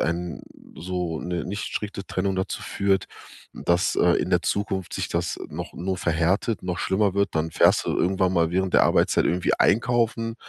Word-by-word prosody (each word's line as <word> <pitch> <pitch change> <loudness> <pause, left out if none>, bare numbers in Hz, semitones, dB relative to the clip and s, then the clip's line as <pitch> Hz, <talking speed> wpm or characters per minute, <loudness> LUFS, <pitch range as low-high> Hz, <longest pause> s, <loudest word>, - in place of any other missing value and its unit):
ein 85 0 -2 0.3
so 90 -2 -3
'ne 90 0 -3
nicht 100 +4 -4
strikte 100 -2 -5
Trennung 95 +1 -1
dazu 95 - -3
führt, 100 -1 0 0.5
dass, 85 +1 +1
äh, 90 -1 +4
in - - -3
der 90 -1 +3
Zukunft 95 -2 -2
sich - - -2
das 85 0 -2
noch - - -7
nur 95 +2 -3
verhärtet, 90 +7 0
noch 90 -1 -2
schlimmer 95 0 +1
wird. 100 -1 +1
Dann 80 +1 -1
fährst - - +4
du - - 0
irgendwann 95 0 +1
mal 85 -2 +2
während 95 +1 -1
der - - +6
Arbeitszeit - - +3
irgendwie 90 +1 +1
einkaufen, 115 0 +2
95 Hz, 175 wpm, -24 LUFS, 85-100 Hz, 0.5 s, der